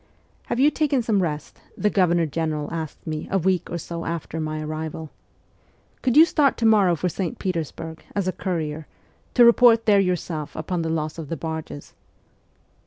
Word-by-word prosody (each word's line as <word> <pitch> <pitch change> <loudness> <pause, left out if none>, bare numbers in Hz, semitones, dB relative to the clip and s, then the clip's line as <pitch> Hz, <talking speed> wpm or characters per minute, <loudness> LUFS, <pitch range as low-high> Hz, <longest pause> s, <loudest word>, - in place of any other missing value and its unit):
' - - -37
Have 240 - -2
you 290 +3 +5
taken 285 -6 +1
some 215 -4 +1
rest? 150 -4 -4
' - - -30
the 210 - +1
Governor 175 -3 +3
General 155 -1 -2
asked 160 -3 -6
me 155 -1 -4
a 195 - +1
week 185 0 0
or 170 - -3
so 170 0 -6
after 165 -1 -4
my 155 0 -3
arrival. 155 0 -5 0.5
' - - -37
Could 255 0 +1
you 320 - +10
start 295 -4 +2
to 230 - -1
morrow 205 -6 +5
for 175 +3 -2
St. 175 0 -3
Petersburg, 165 -2 -4
as 200 -2 0
a - - +2
courier, 160 -4 -3 0.5
to 240 - +7
report 235 -1 +6
there 205 -2 +5
yourself 175 -5 -2
upon 170 +2 -2
the 165 - -2
loss 155 0 -2
of 155 -3 -7
the 165 - -3
barges 160 -1 -6
170 Hz, 190 wpm, -23 LUFS, 155-200 Hz, 0.5 s, you